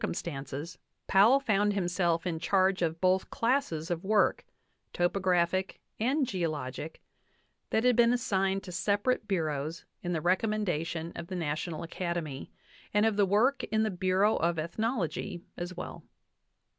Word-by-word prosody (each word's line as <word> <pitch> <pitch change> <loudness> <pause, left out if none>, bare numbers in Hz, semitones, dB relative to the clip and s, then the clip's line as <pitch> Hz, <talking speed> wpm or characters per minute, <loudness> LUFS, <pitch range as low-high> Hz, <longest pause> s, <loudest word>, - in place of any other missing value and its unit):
VIII - - +1
cumstances 145 0 -5 0.3
Powell 215 +8 +6
found 210 -5 +2
himself 175 -3 0
in 165 -3 -2
charge 190 +1 +2
of 165 -1 0
both 185 +1 +2
'classes 230 - 0
of 170 0 -2
work 210 +2 +2 0.5
topographic 180 0 +1 0.2
and 265 +6 +2
geologic 155 - -4 0.7
that 220 - +1
had 250 -1 +4
been 235 0 +5
assigned 195 -5 0
to 185 - -8
separate 205 +5 0
bureaus 160 -4 -2 0.2
in 175 - -3
the 165 - 0
recommendation 175 -3 0
of 170 -1 -6
the 185 - -5
National 160 0 -3
Acad 170 +1 -3
emy, 150 -5 -5 0.4
and 210 +1 +3
of 220 -2 +2
the 200 -1 +3
work 225 +8 +3
in 220 0 +1
the 215 - 0
Bureau 190 +3 +2
of 170 0 +1
Ethnology 180 - -2
as 175 +1 -6
well. - - -7
185 Hz, 145 wpm, -30 LUFS, 170-210 Hz, 0.7 s, Powell